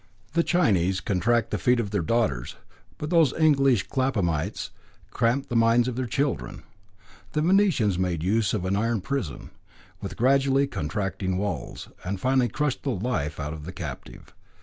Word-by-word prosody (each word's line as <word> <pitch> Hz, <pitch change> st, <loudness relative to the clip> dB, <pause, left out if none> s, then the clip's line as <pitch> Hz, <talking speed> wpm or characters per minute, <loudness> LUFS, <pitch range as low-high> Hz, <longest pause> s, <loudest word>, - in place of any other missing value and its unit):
The 170 Hz, -, +3 dB
Chinese 95 Hz, -, +2 dB
contract 110 Hz, +5 st, +1 dB
the -, -, -1 dB
feet 125 Hz, -1 st, +3 dB
of 105 Hz, -4 st, -2 dB
their 100 Hz, -3 st, 0 dB
daughters, 85 Hz, -, 0 dB, 0.4 s
but 150 Hz, +2 st, -5 dB
those 165 Hz, -6 st, +4 dB
English 135 Hz, -, +3 dB
Claphamites 100 Hz, -, -1 dB, 0.4 s
cramped 125 Hz, +4 st, 0 dB
the 120 Hz, -, -3 dB
minds 115 Hz, +1 st, +4 dB
of 125 Hz, -, -3 dB
their 130 Hz, 0 st, -2 dB
children. 115 Hz, -, -2 dB, 0.7 s
The 150 Hz, -1 st, +1 dB
Venetians 165 Hz, -, +3 dB
made 90 Hz, -4 st, -1 dB
use 105 Hz, +2 st, +1 dB
of 95 Hz, -3 st, -2 dB
an 95 Hz, +1 st, 0 dB
iron 115 Hz, +1 st, 0 dB
prison, 125 Hz, -, -4 dB, 0.5 s
with -, -, -6 dB
gradually 135 Hz, +2 st, +3 dB
contracting 95 Hz, -, -3 dB
walls, 100 Hz, -5 st, -4 dB, 0.2 s
that 95 Hz, +1 st, -3 dB
finally 130 Hz, +1 st, +2 dB
crushed 150 Hz, +3 st, -1 dB
the 140 Hz, -, -3 dB
life 90 Hz, -, -2 dB
out 75 Hz, +1 st, -3 dB
of 80 Hz, -2 st, -8 dB
the -, -, -6 dB
captive. -, -, -8 dB
115 Hz, 160 wpm, -25 LUFS, 95-135 Hz, 0.7 s, those